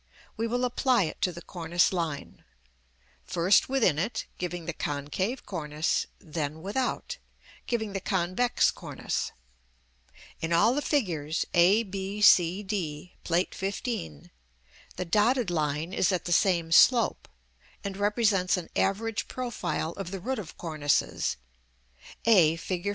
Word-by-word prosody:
we 230 +1 -1
will 245 +2 0
apply 250 -2 +2
it 155 - -5
to 180 - +2
the 170 0 -10
cornice 175 0 +1
line; 165 -5 -4 0.8
first 175 - +3
within 255 - +2
it, 215 +8 -2
giving 175 -2 -4
the 170 - -3
concave 150 - -3
cornice, 155 -3 -1
then 155 0 -5
without, 260 - -2 0.5
giving 220 -4 -2
the 195 - -1
convex 190 +6 +1
cornice. - - -4 1.1
In 160 - -3
all 195 +8 +4
the 290 - 0
figures, 165 - -1
a, 185 +6 +5
b, 195 0 -5
c, 185 -1 +5
d, 180 -5 -4
Plate 175 +1 0
XV., 195 - -4 0.6
the 180 - -3
dotted 215 +3 +2
line 155 +1 -1
is 190 - +2
at 180 -2 -1
the 175 - +1
same 170 -2 +2
slope, 235 +6 +5 0.6
and 200 -1 -4
represents 205 -2 +2
an 175 -2 -7
average 205 +2 0
profile 185 -10 -3
of 195 0 -6
the 195 0 -5
root 255 +7 -3
of 180 -7 -9
cornices 155 - 0 0.9
(a, 180 -9 +6
Fig. 180 +3 -3
185 Hz, 135 wpm, -28 LUFS, 165-215 Hz, 1.1 s, a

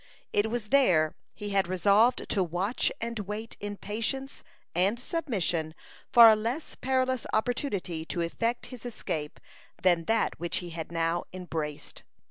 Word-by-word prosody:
It 205 +2 +2
was 225 -2 -3
there 180 - +4 0.2
he 205 0 -5
had 195 -2 +2
resolved 200 +6 +3
to 195 - +2
watch 180 +7 0
and 230 0 -3
wait 210 +3 -5
in 205 0 -5
patience 250 +7 -3 0.3
and 195 +7 +2
submission 190 - -1 0.4
for 235 -2 +10
a 220 - +8
less 235 +8 -3
perilous 260 -1 0
opportunity 215 - -1
to 170 - -3
effect 230 +8 -1
his 245 - -9
escape 160 -10 -4 0.4
than 175 -3 +3
that 225 +4 +1
which 170 0 -1
he 175 -1 -5
had 165 0 -6
now 165 0 0
embraced. 160 -5 -5
205 Hz, 145 wpm, -29 LUFS, 170-235 Hz, 0.4 s, for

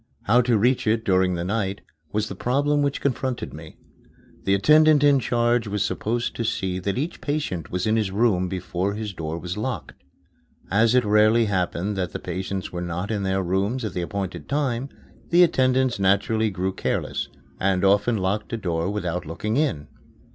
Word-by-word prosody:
How 120 +4 +4
to 120 -2 +2
reach 120 +3 +2
it 110 +1 +1
during 95 -1 +2
the 85 - -3
night 100 0 -2 0.3
was 105 0 -1
the - - -6
problem 145 +4 +1
which 140 -1 -1
confronted 130 -2 -2
me. - - -11 0.7
The 95 - +3
attendant 150 +6 +5
in 145 -1 +5
charge 120 -1 +1
was 100 -1 -1
supposed 115 +2 -2
to 115 - -1
see 95 -4 -1
that 100 +3 -2
each 155 +6 -3
patient 145 - -3
was 90 0 -2
in 110 +1 +2
his 105 -3 0
room 95 -3 +1
before 95 +1 -2
his 105 -2 -5
door 80 -1 -4
was 90 +3 -5
locked. 120 +4 -5 0.7
As 110 +4 +4
it 125 -2 +4
rarely 110 +2 +4
happened 95 0 -1
that 90 -2 -2
the - - -4
patients 95 +2 -4
were 90 - -4
not 90 +4 -3
in 105 -2 -1
their 95 0 0
rooms 100 +7 -1
at 105 - -4
the 90 - -2
appointed 95 +1 -5
time, 135 -3 -1 0.4
the 175 +1 +6
attendants 130 -6 +2
naturally 100 +3 +2
grew 95 -1 -2
careless, - - -2 0.3
and 95 0 +1
often 105 +4 +3
locked 100 +2 -2
a - - 0
door 85 -4 -1
without 90 -4 -3
looking 105 +7 -3
in. 130 - 0
105 Hz, 185 wpm, -24 LUFS, 95-120 Hz, 0.7 s, the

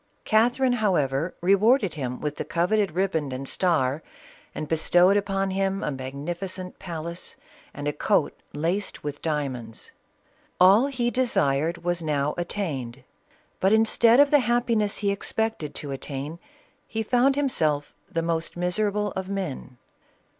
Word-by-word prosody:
Catherine 245 +4 +3
however 160 -5 +1
rewarded 200 - +3
him 125 -4 -4
with 150 -1 -3
the - - -2
coveted 185 +2 +1
riband 165 -6 0
and 130 +1 -5
star, 155 -6 +1 0.5
and 155 - -4
bestowed 175 +4 +4
upon 195 -1 0
him 195 0 -1
a - - -1
magnificent 170 +8 -5
palace 170 -1 -6 0.4
and 145 +1 -6
a 145 - 0
coat 180 +2 +1 0.2
laced 175 +7 -2
with 145 -1 -5
diamonds. 130 -8 -4 0.7
All 195 +8 +6
he 245 -3 -1
desired 170 - +1
was 175 0 0
now 150 -2 0
attain 170 -8 -3
ed, - - -21 0.6
but 190 +2 +3
instead 225 +2 +4
of 285 0 +6
the 295 - +6
happiness 235 -4 +1
he 200 -2 0
expected 200 -6 -2
to 145 - -5
attain 140 +4 -5 0.5
he 225 0 -2
found 250 +4 +3
himself 155 - 0 0.2
the 165 - -1
most 165 0 -2
miserable 205 +3 0
of 190 0 -5
men. 160 -10 -5
180 Hz, 140 wpm, -25 LUFS, 150-210 Hz, 0.7 s, All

